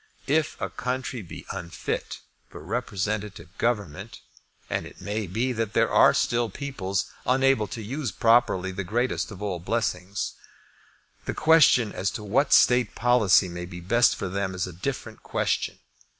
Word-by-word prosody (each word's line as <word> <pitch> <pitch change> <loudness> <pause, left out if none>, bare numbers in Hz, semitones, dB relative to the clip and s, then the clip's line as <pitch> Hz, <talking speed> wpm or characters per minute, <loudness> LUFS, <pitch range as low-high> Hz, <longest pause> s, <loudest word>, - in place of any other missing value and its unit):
If 155 +2 0
a 95 -3 -3
country 125 +2 -3
be 90 - -10
unfit 85 -1 -4 0.3
for - - -11
representative 100 -3 -3
government, 105 -2 -2 0.5
and - - -2
it - - -15
may 105 0 -3
be 120 +8 -1
that 110 -2 -2
there - - +2
are - - +7
still 120 -1 +1
peoples 100 -6 -3 0.2
unable 130 -4 +3
to 115 0 -6
use 130 +2 -3
properly 95 -3 +3
that 100 +1 -4
greatest 120 +7 -1
of 100 -1 -8
all 95 -4 -2
blessings, 95 -1 -2 0.9
the - - -3
question 155 -8 +5
as 95 - -1
to 105 - -9
what 115 +8 +1
state 125 -4 +5
policy 115 -6 +4
may 85 0 -6
be 90 0 -9
best 120 +7 +3
for 95 - -4
them 95 0 -2
is 90 - -1
a 90 - -8
different 110 +3 -5
question. - - -1
105 Hz, 155 wpm, -26 LUFS, 95-120 Hz, 0.9 s, are